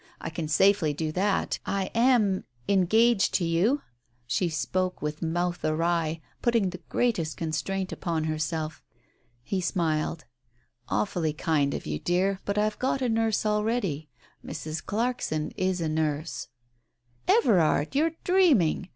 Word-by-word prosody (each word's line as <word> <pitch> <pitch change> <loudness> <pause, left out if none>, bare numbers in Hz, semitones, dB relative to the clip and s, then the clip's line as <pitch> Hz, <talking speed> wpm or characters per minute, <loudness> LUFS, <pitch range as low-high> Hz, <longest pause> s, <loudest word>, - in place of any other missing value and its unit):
I - - -5
can 160 -1 -4
safely 170 -1 +3
do 155 +1 -2
that. 195 +4 0
I 195 -1 -2
am 230 -5 +3
— 120 0 -35
engaged 200 +3 +3
to 175 - +2
you! 190 +13 +2 0.2
" - - -49 0.2
She 135 +10 0
spoke 185 +3 -1
with 150 +1 -4
mouth 175 +2 -1
awry, 165 0 0 0.2
putting 230 -6 +2
the 180 0 -9
greatest 175 -11 0
constraint 165 +4 -2
upon 165 -3 -2
herself. 155 0 -2 0.6
He 190 +6 -2
smiled. 160 -4 -1 0.6
"Awfully 150 - 0
kind 150 -2 +1
of - - -6
you, 75 0 -3
dear, 190 +2 +1
but 200 0 -1
I've 210 0 0
got 265 +1 0
a 250 - +1
nurse 225 -1 +1
already. 210 -8 0 0.3
Mrs. 155 0 -5
Clarkson 220 -9 -1
is 185 -1 0
a 165 - -1
nurse." 155 0 -2 0.4
" 120 0 -40
Everard! 180 - +2
you're 320 +3 +2
dreaming 280 - +3
175 Hz, 140 wpm, -27 LUFS, 155-210 Hz, 0.6 s, safely